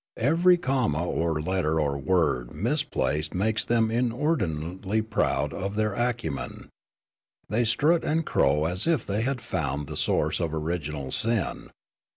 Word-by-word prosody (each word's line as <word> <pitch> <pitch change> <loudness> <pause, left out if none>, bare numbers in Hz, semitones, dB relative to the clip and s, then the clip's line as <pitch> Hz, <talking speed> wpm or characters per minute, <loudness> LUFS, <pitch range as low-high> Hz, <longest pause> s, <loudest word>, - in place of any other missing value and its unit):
Every 170 +8 +4
comma 125 - 0
or 80 -2 0
letter 85 -3 0
or 70 -2 0
word 70 -6 0
misplaced 100 - -1
makes 110 +3 +1
them 115 -2 +2
inordinately 110 - -1
proud 110 -1 0
of 100 +2 -4
their 110 0 +1
acu 120 - -1
men; 70 - -7 0.8
they 115 +4 +1
strut 150 +9 +3
and 160 +1 0
crow 75 +3 +2
as 90 - 0
if 160 -8 +1
they 100 +2 -1
had 130 +1 -1
found 75 -9 -2
the - - -7
source - - +1
of 80 -1 -1
original 75 -4 -3
sin. 115 -5 0
100 Hz, 145 wpm, -26 LUFS, 80-120 Hz, 0.8 s, Every